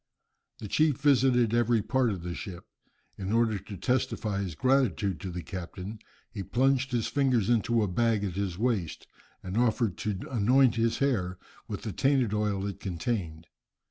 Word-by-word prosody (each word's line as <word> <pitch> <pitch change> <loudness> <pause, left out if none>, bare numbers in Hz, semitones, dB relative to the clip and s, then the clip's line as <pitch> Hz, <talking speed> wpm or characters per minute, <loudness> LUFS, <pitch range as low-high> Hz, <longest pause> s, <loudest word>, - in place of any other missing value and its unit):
The 105 - -7
chief 150 +4 +2
visited 130 -5 +3
every 120 -2 +2
part 130 0 +1
of 95 -5 -4
the 90 0 -4
ship. 90 -1 -7 0.5
In 95 0 -3
order 115 -2 +2
to 100 +1 -9
testify 115 -5 -1
his 90 -5 -4
gratitude 110 - +1
to 95 - -5
the 90 -1 -5
captain 95 +4 -7 0.3
he 100 - -5
plunged 135 +6 +1
his 120 -3 0
fingers 130 -7 +1
into 115 0 +2
a - - 0
bag 110 +2 +1
at 95 -3 -2
his 95 -2 -3
waist, 105 -8 -1 0.4
and 95 +1 -5
offered 115 -3 +1
to 105 -3 -2
anoint 125 +2 +4
his 115 0 +1
hair 95 -10 0 0.3
with - - -5
the - - -3
tainted 135 -6 +2
oil 105 -2 0
it 100 - -5
contained. 85 -3 -3
110 Hz, 170 wpm, -28 LUFS, 95-125 Hz, 0.5 s, anoint